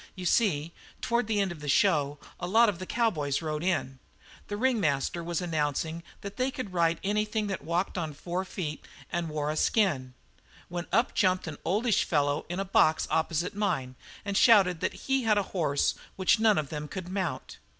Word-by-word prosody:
You 185 - -7
see, 170 -6 +2 0.3
toward 235 -1 0
the 215 -2 +1
end 195 -2 +1
of 170 - -8
the 150 -1 -5
show 145 -4 +3 0.2
a 175 - -3
lot 225 +4 +5
of 185 -4 -4
the 185 - -6
cowboys 155 - 0
rode 155 -1 -3
in. 155 -8 -1 0.5
The 205 - -4
ringmaster 175 - +1
was 170 0 -2
announcing 160 -1 -1 0.2
that 200 0 -8
they 255 +1 +1
could 240 -8 -6
ride 170 -1 +2
anything 210 +2 0
that 195 -3 -4
walked 175 +3 -1
on 160 -3 -3
four 175 +5 -3
feet 170 -5 -5 0.3
and 175 -2 -2
wore 150 -1 -2
a - - -3
skin, 145 - +1 0.5
when 175 0 -4
up 230 +4 +2
jumped 185 -2 +2
an 155 -3 -6
oldish 210 +4 +2
fellow 145 -1 0
in 175 +2 -3
a 195 - -1
box 160 -4 +3
opposite 160 +1 0
mine 145 -11 -1 0.3
and 200 -1 -2
shouted 195 -6 +5
that - - -3
he 270 0 +2
had 220 -3 +2
a 205 - +2
horse 150 -6 +1 0.2
which 190 +2 +3
none 220 -2 +4
of 150 -3 -1
them 150 -1 -5
could 185 +2 -6
mount. 185 -2 -4
175 Hz, 190 wpm, -28 LUFS, 155-205 Hz, 0.5 s, lot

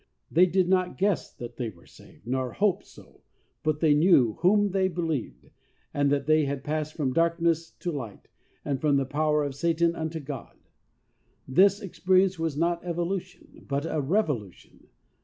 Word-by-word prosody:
They 180 +3 +5
did 185 0 +1
not 185 -1 +1
guess 195 0 0
that 120 -1 -9
they 120 -3 -2
were 85 -5 -17
saved, - - -18
nor 130 0 -2
"hope" 200 -2 +1
so, - - -18 0.4
but 155 -1 -1
they 155 -3 +5
knew 145 - +4
"whom 205 +2 +3
they 190 0 +2
believed," 165 -7 -4 0.4
and 145 -1 +1
that 140 -1 0
they 155 0 +3
had 140 -1 -3
passed 155 +1 -3
from 135 -5 -1
darkness 165 0 +1
to 175 - -5
light 120 -9 -7 0.4
and 140 -3 -2
from 145 -2 +3
the 135 - 0
power 150 +2 +1
of 140 -1 -3
Satan 170 +3 +1
unto 160 0 -4
God." 140 -3 -8 0.9
This 195 +9 +4
experience 190 -2 +1
was 160 -3 -2
not 170 +1 0
evolution, 180 +1 -5
but 140 +2 -1
a 155 -2 -1
revolution. 140 - -3
160 Hz, 165 wpm, -27 LUFS, 140-180 Hz, 0.9 s, They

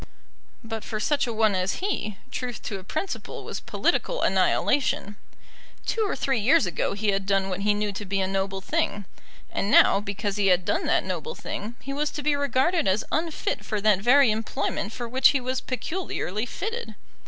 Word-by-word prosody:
But 225 -1 -5
for 215 - -4
such 280 +4 +1
a - - -1
one 220 -2 +2
as 185 0 0
he, 290 - -2
truth 250 -2 -4
to 195 - -4
a - - -12
principle 315 - -4
was - - -5
political - - 0
annihilation. 210 -7 +2 0.7
Two 455 - 0
or - - -2
three 270 -4 0
years 215 0 +4
ago 175 +1 -1
he 205 +1 -1
had 195 -1 0
done 195 -1 +2
what 185 0 -3
he 205 +1 +2
knew 210 0 -1
to 200 - -5
be 195 0 -1
a 190 - +2
noble 195 0 -2
thing; 205 +1 -1 0.5
and 200 - -1
now, 200 - +6
because 205 0 -3
he 200 -1 +2
had 180 -1 +4
done 340 +3 0
that - - +3
noble 475 - -4
thing, 220 +4 -5
he 275 - -5
was 295 +1 0
to 295 - -4
be 295 0 +3
regarded 285 - +1
as 190 +3 +2
unfit 315 -9 -1
for 210 0 -2
that 205 -2 +4
very 245 +3 +5
employment 220 -1 -2
for 240 +1 -5
which 255 +3 +5
he 280 - +2
was 255 +1 -2
peculiarly 255 - -3
fitted. 455 - -5
215 Hz, 195 wpm, -26 LUFS, 200-275 Hz, 0.7 s, now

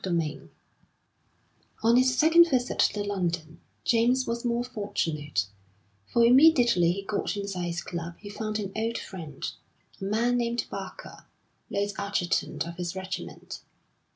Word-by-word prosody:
XX 165 -5 -2 1.3
On 230 +1 +5
his 255 0 +4
second 335 +3 +6
visit 250 -3 0
to 205 - +2
London, 175 -5 -3 0.2
James 245 +3 +3
was 235 0 -3
more 240 0 0
fortunate, 155 - -2 0.6
for 235 0 +4
immediately 245 - +6
he 195 +2 -4
got 205 +1 -2
inside 195 -3 -3
his 170 0 -3
club 170 -1 -5
he 205 - -11
found 215 +1 -3
an 200 -3 -4
old 225 +1 -1
friend, 160 -7 -6 0.5
a - - -5
man 230 +5 +1
named 235 0 0
Barker, 195 -1 -8 0.4
late 205 0 -1
adjutant 200 -5 -1
of 170 0 -8
his 175 0 -4
regiment. 190 0 -6
205 Hz, 135 wpm, -27 LUFS, 175-235 Hz, 1.3 s, second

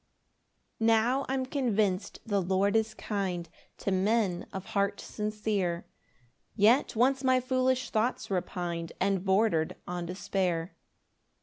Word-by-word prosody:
1 225 - +2
Now 235 +5 +3
I'm 265 -1 0
convinc'd 215 -8 0
the 205 -3 +1
Lord 190 +3 +1
is 220 -1 +1
kind 190 -6 -3 0.3
To 195 - -2
men 195 -1 +1
of 190 0 -6
heart 200 0 +1
sincere, 210 -5 -2 0.7
Yet 225 +6 +4
once 260 +4 +3
my 260 -1 +4
foolish 255 0 0
thoughts 225 -1 0
repin'd 175 -2 -3
And 195 -1 +1
border'd 190 -5 +2
on 175 -1 -4
despair. 180 -1 -2
205 Hz, 120 wpm, -29 LUFS, 185-230 Hz, 0.7 s, Yet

